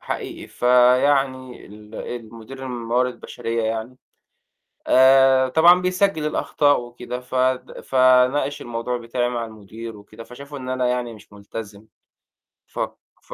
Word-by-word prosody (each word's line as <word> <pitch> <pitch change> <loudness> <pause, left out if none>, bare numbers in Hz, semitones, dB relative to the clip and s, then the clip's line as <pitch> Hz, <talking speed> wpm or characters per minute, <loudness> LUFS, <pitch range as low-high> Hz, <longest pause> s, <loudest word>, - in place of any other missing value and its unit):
حقيقي. - - -6
فيعني 130 +1 +2
ال 105 +1 -14
المدير 115 +2 -8
الموارد 125 +1 -2
بشرية 115 0 -4
يعني، 110 +3 -3 0.9
آآ 130 0 +5
طبعًا 175 +5 +6
بيسجّل 185 -3 0
الأخطاء 145 -3 +1
وكده، 120 +1 -7
فد 130 0 -2
فناقش 130 +2 +3
الموضوع 120 +1 -3
بتاعي 120 +1 -2
مع 120 -2 -3
المدير 110 +1 -10
وكده، 110 +2 -13
فشافوا 140 +4 -10
إن 130 -1 -7
أنا 130 -1 0
يعني 125 -1 -2
مش 105 -1 -17
ملتزم. 105 +1 -9 0.8
ف - - -9 0.4
ف - - -12
125 Hz, 120 wpm, -22 LUFS, 115-130 Hz, 0.9 s, طبعًا